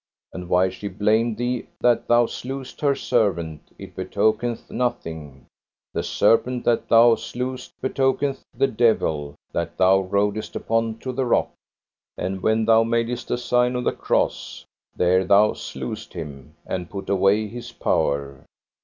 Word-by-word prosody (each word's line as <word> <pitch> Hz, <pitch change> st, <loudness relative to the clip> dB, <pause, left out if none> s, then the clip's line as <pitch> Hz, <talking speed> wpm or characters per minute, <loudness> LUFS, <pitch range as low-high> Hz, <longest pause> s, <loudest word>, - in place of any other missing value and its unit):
And 90 Hz, -1 st, -7 dB
why 90 Hz, +1 st, +3 dB
she 95 Hz, +2 st, -7 dB
blamed 105 Hz, +3 st, +1 dB
thee 120 Hz, 0 st, -2 dB
that 120 Hz, -1 st, +2 dB
thou 120 Hz, 0 st, +5 dB
slewest 130 Hz, +2 st, -7 dB
her 140 Hz, -2 st, +3 dB
servant, 85 Hz, -, 0 dB, 0.2 s
it -, -, -11 dB
betokeneth 110 Hz, +2 st, -1 dB
nothing; 80 Hz, -, -4 dB, 0.5 s
the -, -, -1 dB
serpent 125 Hz, +2 st, +2 dB
that 120 Hz, -1 st, +1 dB
thou 115 Hz, +1 st, +7 dB
slewest 125 Hz, +2 st, -5 dB
betokeneth 135 Hz, +1 st, 0 dB
the -, -, +1 dB
devil 80 Hz, -, +1 dB, 0.2 s
that 85 Hz, -, -3 dB
thou 95 Hz, +1 st, +5 dB
rodest 100 Hz, +2 st, -1 dB
upon 115 Hz, 0 st, -1 dB
to 130 Hz, -, -1 dB
the 130 Hz, 0 st, -1 dB
rock. -, -, +2 dB, 0.7 s
And 95 Hz, 0 st, -3 dB
when 110 Hz, +2 st, +2 dB
thou 115 Hz, 0 st, +5 dB
madest 115 Hz, +1 st, -1 dB
a -, -, 0 dB
sign 125 Hz, 0 st, +1 dB
of 125 Hz, -, -1 dB
the -, -, +2 dB
cross, -, -, -2 dB, 0.3 s
there 90 Hz, +1 st, +3 dB
thou 100 Hz, +3 st, +4 dB
slewest 65 Hz, -1 st, -7 dB
him, 75 Hz, -2 st, -8 dB
and 90 Hz, -2 st, -4 dB
put 100 Hz, -, -7 dB
away 100 Hz, +2 st, +2 dB
his 120 Hz, +2 st, -8 dB
power. 70 Hz, -, -1 dB
110 Hz, 145 wpm, -23 LUFS, 95-120 Hz, 0.7 s, thou